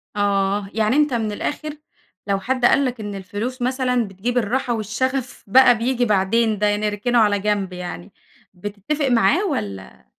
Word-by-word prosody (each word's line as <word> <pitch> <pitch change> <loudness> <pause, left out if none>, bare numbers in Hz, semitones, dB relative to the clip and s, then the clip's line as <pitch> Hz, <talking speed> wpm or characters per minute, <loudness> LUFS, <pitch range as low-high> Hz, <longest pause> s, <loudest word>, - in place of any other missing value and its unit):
آه، 200 0 0
يعني 220 +3 +1
أنت 295 -2 +3
من 220 -3 -1
الآخر 300 +7 -4 0.5
لو 200 -1 +1
حد 255 +4 0
قال 280 +3 +4
لك 250 -2 -3
إن 205 -2 -5
الفلوس 205 +7 -5
مثلًا 250 -2 0
بتجيب 200 +6 -3
الراحة 245 +2 0
والشغف 245 +4 -3
بقى 245 +3 +6
بييجي 245 +2 0
بعدين، 215 +1 +1
ده 205 0 +2
نركنه 210 +3 0
على 205 -2 +3
جنب 200 -2 -1
يعني، 180 +2 -7 0.4
بتتفق 205 - -3
معاه 265 - +3
والّا؟ 100 - -5
220 Hz, 155 wpm, -21 LUFS, 200-250 Hz, 0.5 s, بقى